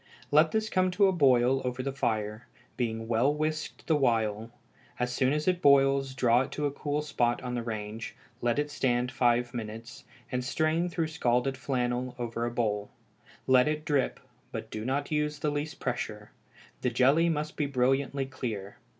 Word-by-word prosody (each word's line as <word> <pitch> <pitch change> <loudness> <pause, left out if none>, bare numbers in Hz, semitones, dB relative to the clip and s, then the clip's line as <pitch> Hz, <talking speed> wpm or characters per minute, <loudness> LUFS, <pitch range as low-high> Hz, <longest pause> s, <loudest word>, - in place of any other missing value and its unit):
Let 155 +2 +5
this 220 0 0
come 185 -3 +2
to 200 - +6
a 190 - +4
boil 135 -5 +4
over 125 0 -3
the 135 - -2
fire, 110 -3 -2 0.3
being 115 -2 -2
well 120 +4 +3
whisked 155 +1 -3
the 160 - +3
while; 115 -5 +1 0.5
as 125 0 -1
soon 130 +1 +2
as 150 +2 -1
it 180 -1 +2
boils 135 -1 +4
draw 125 -2 +4
it 135 - -4
to 150 - -2
a 145 - +1
cool 145 +1 -2
spot 120 -5 0
on 125 -1 -3
the 120 - -1
range, 110 -1 -5 0.3
let 120 +1 +1
it 145 0 -1
stand 125 -3 0
five 120 0 +2
minutes, 115 +1 -7 0.3
and 125 0 -1
strain 160 +6 0
through 170 -2 -1
scalded 125 -2 +1
flannel 125 -1 -2
over 120 -1 -2
a - - -3
bowl; 105 -4 -1 0.6
let 130 +1 +5
it 155 0 -2
drip, 145 -4 0 0.3
but - - -6
do 110 - -4
not 140 +4 -1
use 150 0 0
the 150 0 -1
least 145 +1 -4
pressure. 105 -4 -4 0.5
This 125 - 0
jelly 140 +8 +4
must 155 -1 -2
be 150 - 0
brilliantly 135 +1 +1
clear. 110 -7 -5
130 Hz, 180 wpm, -29 LUFS, 120-150 Hz, 0.6 s, to